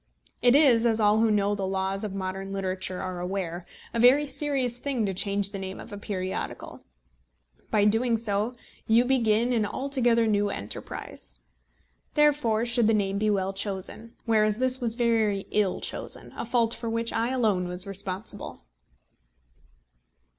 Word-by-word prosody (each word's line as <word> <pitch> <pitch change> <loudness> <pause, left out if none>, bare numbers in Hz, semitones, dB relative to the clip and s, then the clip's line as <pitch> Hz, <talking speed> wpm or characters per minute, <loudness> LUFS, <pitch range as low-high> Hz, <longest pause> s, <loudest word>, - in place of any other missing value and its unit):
It 245 +1 +5
is, 265 -6 +5
as 225 -2 +2
all 210 0 +4
who 225 0 +3
know 205 -1 +2
the 195 -2 -2
laws 190 +1 -1
of 210 - -3
modern 195 0 -4
literature 185 -1 -3
are 185 -1 -4
aware, 180 -1 -4 0.3
a 235 - -1
very 260 +5 +6
serious 270 -3 -1
thing 260 -6 -1
to 195 - -1
change 200 +1 0
the 200 - -5
name 190 0 -6
of 220 - -10
a - - -5
periodical. 190 -3 -5 0.9
By 210 -1 +3
doing 230 +2 +2
so 215 +2 -1 0.3
you 230 +2 +5
begin 240 -2 +2
an 225 -3 +2
altogether 240 0 +1
new 205 -1 +2
enterprise. 100 - -6 0.7
Therefore 280 -7 +3
should 235 -2 +2
the 225 - +4
name 200 -1 0
be 215 0 +1
well 195 -1 0
chosen; 200 +3 -4
whereas 215 -2 +3
this 255 +1 +1
was 230 -2 -1
very 225 -5 +1
ill 205 -3 +1
chosen, - - -5
a - - -4
fault 235 -1 +1
for 230 0 -4
which 230 0 -1
I 230 +1 0
alone 215 -8 +1
was 180 +1 -2
responsible. 195 - -6
215 Hz, 160 wpm, -27 LUFS, 195-235 Hz, 0.9 s, very